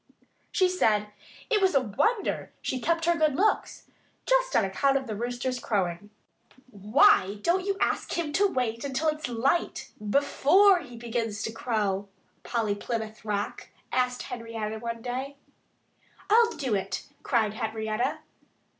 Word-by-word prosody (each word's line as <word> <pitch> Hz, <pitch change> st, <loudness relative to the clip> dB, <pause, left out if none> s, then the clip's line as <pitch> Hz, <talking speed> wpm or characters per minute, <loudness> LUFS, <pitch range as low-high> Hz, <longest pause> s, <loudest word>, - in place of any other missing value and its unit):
She 370 Hz, -, +3 dB
said 215 Hz, -, +1 dB, 0.4 s
it 425 Hz, -3 st, +3 dB
was 380 Hz, -4 st, +3 dB
a -, -, +7 dB
wonder 270 Hz, -, -1 dB
she 260 Hz, -, -3 dB
kept 330 Hz, +4 st, +1 dB
her 345 Hz, 0 st, +3 dB
good 310 Hz, -4 st, +2 dB
looks, 420 Hz, +7 st, 0 dB, 0.4 s
just -, -, +2 dB
on 215 Hz, -, +4 dB
account 275 Hz, +8 st, +2 dB
of 270 Hz, -, -4 dB
the 220 Hz, -3 st, -4 dB
Rooster's 245 Hz, +3 st, -3 dB
crowing. 195 Hz, -4 st, -2 dB, 0.6 s
"Why 210 Hz, -, +4 dB
don't 365 Hz, +3 st, +1 dB
you 395 Hz, -1 st, 0 dB
ask -, -, 0 dB
him 315 Hz, -4 st, -2 dB
to 405 Hz, +5 st, +4 dB
wait 235 Hz, -, -2 dB
until 280 Hz, +3 st, 0 dB
it's 305 Hz, -3 st, -3 dB
light, 265 Hz, +8 st, 0 dB
before 290 Hz, -, +4 dB
he 245 Hz, -7 st, -11 dB
begins 225 Hz, -3 st, -3 dB
to 225 Hz, -, -2 dB
crow?" 210 Hz, -4 st, -1 dB, 0.3 s
Polly 225 Hz, -4 st, -1 dB
Plymouth 220 Hz, +1 st, -5 dB
Rock 205 Hz, -1 st, -3 dB, 0.2 s
asked 250 Hz, -1 st, 0 dB
Henrietta 230 Hz, -3 st, -5 dB
one 230 Hz, 0 st, -5 dB
day. 260 Hz, +3 st, -4 dB, 0.9 s
"I'll 460 Hz, +1 st, +6 dB
do 270 Hz, -7 st, -2 dB
it!" 195 Hz, -2 st, -2 dB, 0.2 s
cried 220 Hz, -5 st, +1 dB
Henrietta. 220 Hz, 0 st, -2 dB
245 Hz, 145 wpm, -27 LUFS, 220-310 Hz, 0.9 s, a